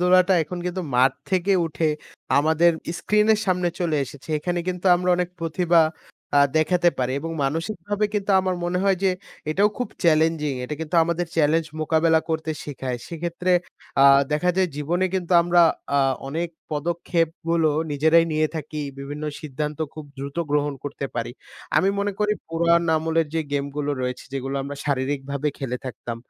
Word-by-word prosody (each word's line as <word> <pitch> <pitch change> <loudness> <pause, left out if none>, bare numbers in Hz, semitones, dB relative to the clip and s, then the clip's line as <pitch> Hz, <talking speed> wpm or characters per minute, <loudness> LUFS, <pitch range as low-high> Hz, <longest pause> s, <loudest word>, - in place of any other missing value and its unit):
ধুলাটা 185 +1 +5
এখন 175 +3 -6
কিন্তু 180 +1 -3
মাঠ 130 +1 +5 0.2
থেকে 190 +1 +2
উঠে 160 0 0 0.5
আমাদের 160 +3 +4 0.3
স্ক্রিনের 210 0 +3
সামনে 180 -1 +1
চলে 165 -3 +1
এসেছে। 135 +2 -13
এখানে 175 +3 -2
কিন্তু 180 +1 -3
আমরা 180 +1 -2
অনেক 180 -1 -1
প্রতিভা 170 +1 +3 0.6
আ - - +7 0.2
দেখাতে 175 +2 +3
পারি 130 0 0
এবং 165 +3 -5
মানসিকভাবে 180 +7 -2
কিন্তু 205 -1 -1
আমার 185 -1 -1
মনে 175 +1 0
হয় 195 -1 +3
যে 190 - +4 0.4
এটাও 200 +6 +3
খুব 250 - -2 0.2
চ্যালেঞ্জিং। 160 -2 +3
এটা 150 +4 -4
কিন্তু 160 +2 -5
আমাদের 170 +1 -1
চ্যালেঞ্জ 160 +1 +3
মোকাবেলা 160 +1 +3
করতে 160 0 -2
শেখায়। 130 -4 -4
সেক্ষেত্রে 170 +2 -2 0.5
আ - - +7 0.3
দেখা 180 +4 +2
যায় 190 -1 +3
জীবনে 170 +5 0
কিন্তু 185 -1 -1
আমরা 175 0 +4 0.7
অনেক 165 +4 -2 0.2
পদক্ষেপগুলো 165 +1 0 0.2
নিজেরাই 160 +3 +4
নিয়ে 155 0 +2
থাকি 155 0 -5 0.2
বিভিন্ন 145 +2 -6 0.2
সিদ্ধান্ত 150 0 -4 0.2
খুব 155 - -8
দ্রুত 140 +3 -6
গ্রহণ 145 -1 +1
করতে 140 -1 -4
পারি। 120 0 -3 0.4
আমি 190 - +4
মনে 200 0 0
করি 210 0 +2 0.2
পুরাণ 170 +1 +3
আমলের 160 0 +1
যে 165 - +1
গেমগুলো 140 +1 -2
রয়েছে 125 0 -3
যেগুলো 135 0 -3
আমরা 140 +1 -6
শারীরিকভাবে 140 +1 -1
খেলে 125 -3 -3
থাকতাম। 120 -1 -6
160 Hz, 155 wpm, -23 LUFS, 145-175 Hz, 0.7 s, আ